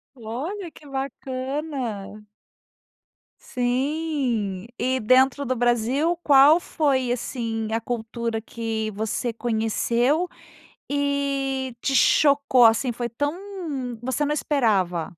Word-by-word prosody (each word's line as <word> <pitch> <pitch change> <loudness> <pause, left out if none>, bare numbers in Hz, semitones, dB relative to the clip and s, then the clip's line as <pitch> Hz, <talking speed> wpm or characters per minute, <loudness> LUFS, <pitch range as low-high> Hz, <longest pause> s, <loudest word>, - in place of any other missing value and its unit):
Olha, 300 - -5
que 305 - -17
bacana. 260 -5 -4 1.2
Sim, 250 - -1
e 260 +1 +1
dentro 260 +4 +4
do 255 - 0
Brasil 245 +7 +1
qual 285 +3 +7
foi, 270 -8 0
assim, 230 -3 -3
a 225 - +1
cultura 230 -1 -3
que 225 -1 -3
você 220 +3 -2
conheceu 235 +7 0 0.6
e 275 -2 -1
te 275 - -1
chocou, 280 -2 +5
assim, 230 +2 +4
foi 240 +1 -3
tão 290 +7 -2 0.6
você 260 +4 -1
não 295 - 0
esperava? 205 - 0
255 Hz, 100 wpm, -24 LUFS, 225-280 Hz, 1.2 s, qual